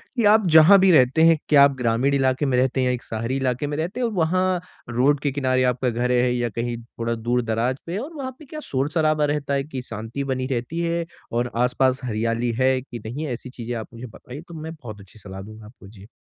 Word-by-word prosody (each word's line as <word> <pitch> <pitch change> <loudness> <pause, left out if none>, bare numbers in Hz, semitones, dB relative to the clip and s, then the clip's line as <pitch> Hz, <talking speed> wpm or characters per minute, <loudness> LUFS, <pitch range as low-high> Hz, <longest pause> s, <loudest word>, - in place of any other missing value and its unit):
कि 240 - 0
आप 215 -2 +3
जहाँ 160 +6 +9
भी 190 0 +5
रहते 135 0 +4
हैं, 165 -1 +6
क्या 145 -2 +7
आप 140 -1 +4
ग्रामीण 125 +3 +1
इलाके 135 +1 +1
में 130 -3 +1
रहते 130 +1 +1
हैं 130 - +1
या 125 - +1
एक 125 - -5
शहरी 115 +3 -3
इलाके 130 +1 -1
में 145 0 -3
रहते 175 +10 -3
हैं, 245 - +1
और 225 - -5
वहाँ 185 +1 +1 0.3
रोड 130 +5 +2
के 145 0 -1
किनारे 130 -2 +1
आपका 125 +1 -1
घर 120 +2 -1
है 125 0 +2
या 120 -1 -1
कहीं 120 +2 -3
थोड़ा 115 0 -4
दूर-दराज़ 120 +1 -1
पे, 175 +4 -4
और 280 +9 -6
वहाँ 270 -4 -5
पे 310 - -13
क्या 305 +3 -8
शोर-शराबा 150 +3 0
रहता 140 -1 -2
है 140 0 0
कि 135 -3 -6
शांति 115 +5 -5
बनी 130 -1 -2
रहती 125 +7 -3
है, 170 0 -1 0.3
और 120 +1 -1
आस-पास 125 +2 +1
हरियाली 115 +1 -1
है 130 0 +3
कि 120 -2 -9
नहीं 130 +8 -5
है? 135 - -3
ऐसी 125 +2 -8
चीज़ें 120 -1 -6
आप 110 -2 -5
मुझे 115 +2 -8
बताइए, 125 +5 -11
तो 170 0 -14
मैं 160 +1 -6
बहुत 110 -5 -9
अच्छी 100 +3 -16
सलाह 95 -1 -9
दूँगा 110 +2 -11
आपको, 105 -2 -15
जी। 100 -1 -14
130 Hz, 240 wpm, -23 LUFS, 120-150 Hz, 0.3 s, जहाँ